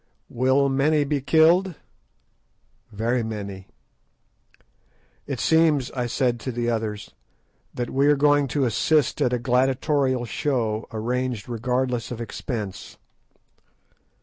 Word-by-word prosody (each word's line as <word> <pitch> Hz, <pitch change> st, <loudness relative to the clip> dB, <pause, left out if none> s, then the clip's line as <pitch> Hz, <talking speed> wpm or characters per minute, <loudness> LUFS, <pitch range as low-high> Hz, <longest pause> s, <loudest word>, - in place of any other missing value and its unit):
"Will 130 Hz, +3 st, +2 dB
many 145 Hz, +3 st, +2 dB
be 145 Hz, 0 st, -1 dB
killed?" 165 Hz, +6 st, +3 dB, 1.2 s
"Very 115 Hz, +4 st, -1 dB
many." 100 Hz, -4 st, -6 dB, 1.6 s
"It -, -, -4 dB
seems," 160 Hz, -5 st, +2 dB
I 125 Hz, -2 st, -2 dB
said 120 Hz, -1 st, 0 dB
to 130 Hz, -, -4 dB
the 120 Hz, 0 st, -1 dB
others, 110 Hz, -2 st, -4 dB, 0.6 s
"that 120 Hz, -1 st, -3 dB
we 135 Hz, +2 st, +2 dB
are 150 Hz, -, +5 dB
going 145 Hz, 0 st, +3 dB
to 135 Hz, +2 st, 0 dB
assist 140 Hz, +5 st, +1 dB
at 125 Hz, -, +2 dB
a 125 Hz, -, +1 dB
gladiatorial 130 Hz, +1 st, +1 dB
show 115 Hz, -3 st, -2 dB
arranged 120 Hz, 0 st, -3 dB
regardless 125 Hz, +1 st, -2 dB
of 120 Hz, -, -6 dB
expense." 115 Hz, -4 st, -6 dB
125 Hz, 115 wpm, -24 LUFS, 115-140 Hz, 1.6 s, are